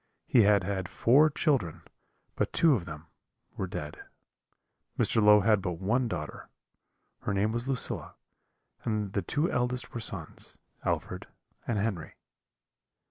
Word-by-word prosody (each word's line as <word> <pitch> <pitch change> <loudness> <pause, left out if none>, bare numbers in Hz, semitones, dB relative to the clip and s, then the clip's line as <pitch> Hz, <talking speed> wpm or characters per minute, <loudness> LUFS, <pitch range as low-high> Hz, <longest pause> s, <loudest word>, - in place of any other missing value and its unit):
He 120 - +5
had 100 -2 +4
had 95 -1 -2
four 145 +7 +5
children, 135 - 0 0.5
but - - 0
two 165 -3 +4
of 100 -10 -1
them 80 -1 -8 0.5
were 95 - -3
dead. 75 -4 -6 0.9
Mr. 110 - +2
Low 105 0 +7
had 105 0 +3
but 90 -1 -2
one 110 +9 0
daughter, 80 -8 -6 0.7
her 105 - -2
name 105 +3 +2
was 120 +2 -3
Lucilla; 135 -2 -2 0.7
and 105 -3 -2
the 100 - +1
two 150 - 0
eldest 125 0 -1
were 115 - -3
sons, 110 - -4 0.3
Alfred - - -2 0.4
and 115 - 0
Henry. 100 -5 -2
105 Hz, 135 wpm, -29 LUFS, 95-125 Hz, 0.9 s, Low